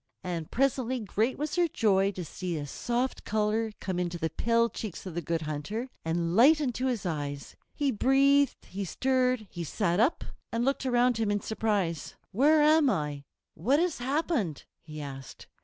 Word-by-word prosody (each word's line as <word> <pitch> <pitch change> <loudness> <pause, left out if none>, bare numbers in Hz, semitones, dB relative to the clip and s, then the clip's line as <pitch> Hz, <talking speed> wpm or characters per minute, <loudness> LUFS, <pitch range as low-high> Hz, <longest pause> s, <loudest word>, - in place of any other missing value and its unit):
And 170 -3 -4
presently 260 -1 0
great 220 +4 -1
was 300 +1 -3
their 350 -1 +3
joy 200 -9 +2
to 180 -2 -5
see 175 +1 -4
a 145 - -4
soft 245 - -2
color 215 +1 0
come 185 -2 -3
into 175 -1 -2
the 160 -1 -2
pale 230 0 +2
cheeks 215 -5 -7
of 185 - -6
the 175 - -2
Good 165 0 -2
Hunter, 155 - -4
and 170 +1 -1
light 285 +8 +7
into 260 -3 -1
his 240 -6 -2
eyes. 145 -4 -4 0.2
He 285 -2 +1
breathed, 275 +4 +3
he 200 +2 -5
stirred, 255 +3 +1
he 175 - -5
sat 175 +3 0
up 250 +9 +2 0.3
and 230 +1 0
looked 275 0 0
around 245 -1 +3
him 220 -2 0
in 205 0 +1
surprise. 205 -8 -1 0.2
"Where 295 +8 +4
am 305 -1 +5
I? 150 - -2 0.3
What 250 - +2
has 345 -4 0
happened?" 260 - -1 0.2
he 155 -1 -9
asked. 135 -2 -9
220 Hz, 175 wpm, -29 LUFS, 170-260 Hz, 0.3 s, light